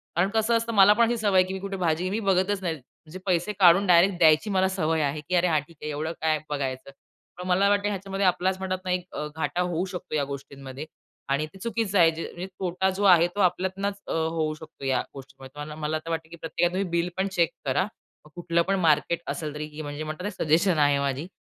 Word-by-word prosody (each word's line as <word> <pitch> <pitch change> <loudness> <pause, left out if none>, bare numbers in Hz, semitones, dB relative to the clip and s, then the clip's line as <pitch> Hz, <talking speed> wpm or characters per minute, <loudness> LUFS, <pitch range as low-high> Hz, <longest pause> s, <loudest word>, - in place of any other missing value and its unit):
कारण 180 +4 +2
कसं 220 +2 +1
असतं 230 0 -3
मला 205 0 +7
पण 235 +2 +4
अशी 240 0 0
सवय 205 -3 +1
आहे 185 - +6
की 190 - -5
मी 190 - -4
कुठे 195 0 -5
भाजी 175 0 0
मी 210 +3 -1
बघतच 195 0 +1
नाही. 170 -3 -2
म्हणजे 155 +5 -14
पैसे 180 +2 0
काढून 185 +2 +6
डायरेक्ट 180 +1 +5
द्यायची 160 +4 +4
मला 190 -1 +2
सवय 160 -4 0
आहे 145 +1 -2
की 180 +4 -2
"अरे 180 +1 +3
हां, 155 -3 +2
ठीक 160 +2 -19
आहे. 150 - -4
एवढं 155 +3 -3
काय 155 -1 +2
बघायचं?" 135 -2 -4 0.5
पण 180 0 -6
मला 195 +2 +3
वाटतं 205 0 +2
ह्याच्यामध्ये 195 0 -2
आपलाच 185 +1 +1
म्हणतात 185 -1 -2
ना 180 - -1
एक 180 0 -1
अ, 150 - -3
घाटा 175 +2 -1
होऊ 180 0 -1
शकतो 175 - -5
या 145 - +1
गोष्टींमध्ये. 140 0 -8 0.4
आणि 140 +3 +1
ते 175 - -16
चुकीचं 220 -2 -1
आहे 165 -1 +6
जे 160 +1 -6
म्हणजे 180 +2 -6
तोटा 185 +1 0
जो 190 +2 -3
आहे 170 +1 +3
तो - - -4
आपल्यातनच 190 +2 0
अ, - - -4
होऊ 160 -1 -1
शकतो 155 -3 -11
या 135 -1 +1
गोष्टींमध्ये. 135 -1 -12
तर 145 - -5
मना 150 0 -8
मला 155 0 -1
तर - - -6
वाटतं 160 -1 -3
की 170 - -10
प्रत्येका 175 +2 0
तुम्ही 190 0 -1
बिल 170 +1 0
पण 190 - +1
चेक 170 -2 +4 0.2
करा. 140 +7 +1 0.4
मग 150 - -16
कुठलं 170 -1 0
पण 195 - +2
मार्केट 165 +1 +2
असेल 155 -3 -4
तरी 150 0 -5
की 150 +1 -8
म्हणजे 145 +1 -5
म्हणतात 155 +3 -6
ना 205 - -1
सजेशन 165 +3 +3
आहे 145 -1 +4
माझी. 140 +3 -2
175 Hz, 240 wpm, -26 LUFS, 155-190 Hz, 0.5 s, मला